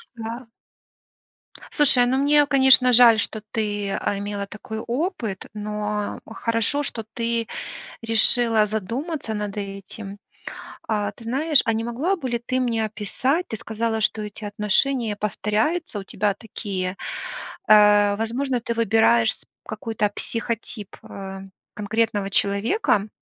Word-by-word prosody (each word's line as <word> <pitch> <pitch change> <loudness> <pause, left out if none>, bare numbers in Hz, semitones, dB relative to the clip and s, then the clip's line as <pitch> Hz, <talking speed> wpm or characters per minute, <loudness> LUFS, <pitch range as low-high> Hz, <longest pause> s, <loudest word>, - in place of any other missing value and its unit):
Да. 230 +2 -6 1.3
Слушай, 265 -5 +5
ну, 255 +2 +1
мне, 290 +1 +4
конечно, 265 -2 +6
жаль, 235 -2 +7
что 220 0 -2
ты, 205 -2 -2
а, 200 +1 -1
имела 200 0 -4
такой 215 +2 -7
опыт, 240 - -3
но 210 0 -3
хорошо, 230 +5 0
что 225 -5 -3
ты 230 -1 -1 0.5
решила 225 -1 +4
задуматься 230 - -3
над 210 -1 -4
этим. 200 0 -7 0.7
А, 205 -2 0
ты 225 +3 -15
знаешь, 285 +5 +3
а 225 - +2
не 225 - -1
могла 265 +12 0
бы 330 -8 -5
ли 235 - -1
ты 255 +2 -1
мне 235 -3 0
описать 230 - -1
ты 220 - -3
сказала, 220 +1 -2
что 215 0 0
эти 210 +1 -7
отношения 210 +3 +1
повторяются 210 - -1
у 195 - -7
тебя 205 +1 0
такие. 195 -3 -4 0.7
Э, 205 -1 +6
возможно, 245 +3 -1
ты 235 0 -3
выбираешь 220 - +4
сп - - -16 0.2
какой-то 215 -1 -2
психотип, 230 -3 -3
э, 195 -1 -7 0.3
конкретного 210 -1 -1
человека. 205 - +1
220 Hz, 130 wpm, -23 LUFS, 205-240 Hz, 1.3 s, жаль